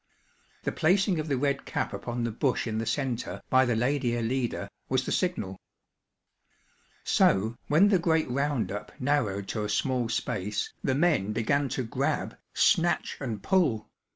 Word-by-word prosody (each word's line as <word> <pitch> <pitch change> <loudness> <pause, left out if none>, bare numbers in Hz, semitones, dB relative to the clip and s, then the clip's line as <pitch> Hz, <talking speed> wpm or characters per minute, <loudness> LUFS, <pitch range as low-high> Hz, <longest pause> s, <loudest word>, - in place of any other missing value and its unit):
The - - -1
placing 185 +1 +2
of 155 - -3
the 140 -3 0
red 140 +1 0
cap - - -2
upon 120 0 -3
the 115 - -1
bush 130 +4 0
in 110 -2 -2
the 115 - -3
centre, 125 0 -2
by 130 0 +5
the 120 -2 +1
lady 125 0 +1
Alida, 120 -3 -2 0.2
was 130 0 +1
the - - -3
signal. 105 - -1 1.4
So, 110 +4 +3
when 170 +8 +5
the 195 -3 +4
great 160 -2 +2
round 140 0 0
up 105 +1 -6
narrowed 115 -8 0
to 105 - -2
a 105 - -3
small 125 +2 0
space, 105 -3 -2
the 130 - +1
men 140 - +2
began 140 +5 +1
to 130 - 0
grab, 115 - -1 0.2
snatch 175 +1 +2
and 115 -8 -4
pull. 160 - +1
130 Hz, 160 wpm, -28 LUFS, 110-145 Hz, 1.4 s, by